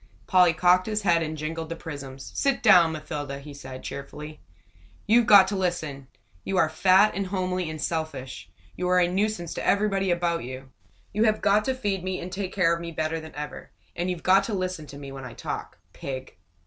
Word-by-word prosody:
Polly 180 -2 +5
cocked 180 +3 +3
his 215 -1 -1
head 170 -3 +3
and 155 -1 -3
jingled 160 +1 -4
the 165 - -3
prisms. 140 -5 -8
"Sit 275 -2 0
down, 170 -2 +7
Mathilda!" 150 -3 -5
he 145 +1 -10
said, 130 -2 -9
cheerfully. 150 +2 -7 0.7
"You've 230 +1 +4
got 200 -2 +8
to 205 - -2
listen. 155 -8 -2 0.4
You 195 - -2
are 160 -4 +4
fat 190 +5 +5
and 195 +2 -2
homely 185 -2 -2
and 155 0 -6
selfish. 135 - -4 0.3
You 180 0 -2
are 180 0 +4
a 175 - +4
nuisance 185 -2 -1
to - - -5
everybody 200 -2 +2
about 170 -2 0
you. 130 +1 -8 0.4
You 215 +3 +2
have 215 -1 +2
got 205 +1 +3
to 265 - 0
feed 200 -7 -2
me 185 0 -2
and 180 - -7
take 190 0 -4
care 175 -4 +3
of 170 - -3
me 170 0 -5
better 160 0 -2
than 160 0 -11
ever 150 0 -7 0.3
and 175 +1 -2
you've 180 -2 -4
got 190 +1 +5
to 215 - -2
listen 185 -5 -3
to 140 - -10
me 140 -1 -8
when 135 -1 -8
I 125 -2 -8
talk. - - -6 0.2
Pig!" 130 -5 -7
170 Hz, 210 wpm, -26 LUFS, 150-190 Hz, 0.7 s, got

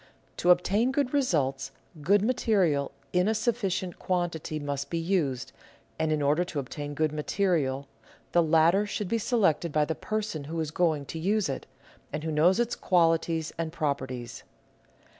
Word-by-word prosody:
To 175 - +1
obtain 200 +7 +4
good 270 -1 0
results, 145 - +1 0.3
good 200 +6 +3
material 195 - +1 0.2
in 180 +2 +3
a 220 - +2
sufficient 195 -7 -1
quantity 175 -4 -2
must 140 -1 -4
be 170 - -2
used, 150 -7 -1 0.5
and, 160 0 +1
in 150 -1 +1
order 150 +5 +3
to 175 -3 -7
obtain 145 +2 -5
good 155 0 +1
material, 150 -4 0 0.4
the 175 - +4
latter 165 +5 +4
should 205 -1 -3
be 230 - +1
selected 190 - +1
by 150 0 +2
the 160 - -1
person 210 -7 -3
who 165 +3 -4
is 155 -2 -2
going 160 -4 +1
to 160 - -6
use 200 +1 +1
it, 135 - -4 0.4
and 150 +1 -4
who 160 - -2
knows 170 +7 +4
its 240 0 0
qualities 165 -2 +1
and 165 -1 -2
properties. 130 -7 -3
165 Hz, 160 wpm, -28 LUFS, 150-195 Hz, 0.5 s, obtain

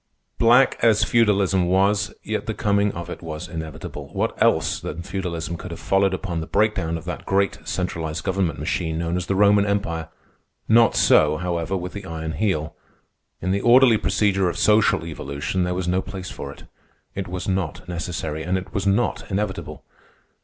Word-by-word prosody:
Black 120 +3 +5
as 115 -3 +4
Feudalism 100 -6 +2
was, 100 +3 +2
yet 110 0 -3
the 110 - -2
coming 100 0 +1
of 85 0 -6
it 90 - -7
was 80 -2 -6
inevitable. 80 -2 -7
What - - 0
else - - +2
than 85 +3 -6
Feudalism 85 -3 -4
could 90 - -8
have 85 - -7
followed 95 0 +2
upon 90 -4 -4
the 80 - -6
breakdown 95 -6 +1
of 80 - -10
that 90 - -5
great 100 0 +1
centralized 80 -4 -3
governmental 95 -3 -1
machine 80 -1 -1
known 85 +1 -1
as 90 -1 -3
the 95 - 0
Roman 100 +1 +5
Empire? 90 -6 -2 0.6
Not 115 0 +5
so, 75 0 +4
however, 90 +1 -2
with 90 0 -6
the 100 -1 -7
Iron 80 -1 -4
Heel. 80 -2 -1 0.7
In 90 - 0
the 100 +1 0
orderly 120 -1 +6
procedure 95 -3 +1
of - - -5
social 105 -6 +3
evolution 80 +3 -3
there 90 0 -1
was 90 -1 -2
no 90 +1 +1
place 95 -1 -7
for 70 - -7
it. - - -14 0.5
It 95 -1 -4
was 90 0 -5
not 95 -6 -2
necessary, 85 -3 -4
and 90 +4 0
it 95 - -7
was 100 0 -1
not 100 +5 0
inevitable. 100 0 -3
95 Hz, 180 wpm, -23 LUFS, 85-100 Hz, 0.7 s, orderly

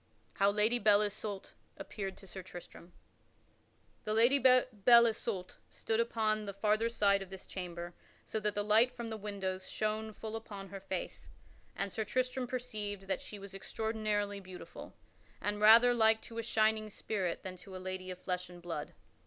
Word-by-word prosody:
[Sidenote: - - -22
How 200 0 +5
Lady 225 +3 +3
Belle 205 -1 +5
Isoult 205 -1 -4 0.3
appeared 195 -3 -5
to 195 - -13
Sir 190 0 -7
Tristram] 175 -1 -11 1.1
The 215 - -1
Lady 240 +5 +5
Belle 245 -3 +6
Isoult 220 -5 -2
stood 225 0 -2
upon 215 -2 +1
the 200 -1 -6
farther 215 +3 +2
side 200 -4 +3
of 195 - -7
this 190 -1 -9
chamber 175 -2 -6 0.3
so 220 - -2
that 210 0 -1
the 205 - 0
light 220 +4 +5
from 235 -1 -6
the - - -2
windows 195 -3 -4
shone 215 0 -2
full 220 +1 -6
upon 200 -3 -7
her 195 +1 -7
face, 195 - -5 0.5
and 195 - -2
Sir 220 - -2
Tristram 255 +3 -1
perceived 215 -5 -4
that 195 - -2
she 210 - -9
was 200 0 -10
extraordinarily 210 0 -2
beautiful, 185 -2 -10 0.4
and 205 0 -2
rather 230 +3 +8
like 220 -1 +4
to 230 0 -7
a - - +1
shining 220 -1 +2
spirit 195 -4 -3
than 185 -1 -6
to 190 +1 -11
a - - -4
lady 185 0 -5
of 180 - -5
flesh 180 0 -3
and 175 0 -11
blood. 170 -4 -5
210 Hz, 175 wpm, -33 LUFS, 190-220 Hz, 1.1 s, rather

